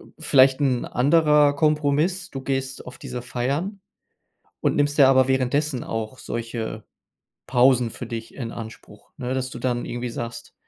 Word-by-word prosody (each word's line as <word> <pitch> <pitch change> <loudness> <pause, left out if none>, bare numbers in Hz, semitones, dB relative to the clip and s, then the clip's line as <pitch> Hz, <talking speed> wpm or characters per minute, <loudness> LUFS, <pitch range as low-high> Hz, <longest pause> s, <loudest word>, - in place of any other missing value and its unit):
äh, - - -15
vielleicht 135 +1 +4
'n 130 -4 +1
anderer 150 +1 +4
Kompromiss: 150 +4 +1
Du 135 - -6
gehst 135 0 -3
auf 125 0 -10
diese 125 - -6
Feiern 140 - -3 0.8
und - - +1
nimmst 145 0 +1
dir 135 -3 +7
aber 130 -1 +5
währenddessen 130 +1 0
auch 115 +2 -4
solche 115 -2 -5 0.6
Pausen 125 -1 +4
für 120 - -8
dich 115 -1 -7
in 120 -4 -5
Anspruch. 115 -1 -11
Ne, 125 +1 -3
dass 130 -1 -2
du 125 - -8
dann 120 -1 -1
irgendwie 120 0 -4
sagst, 115 0 -7
130 Hz, 155 wpm, -23 LUFS, 120-145 Hz, 0.8 s, dir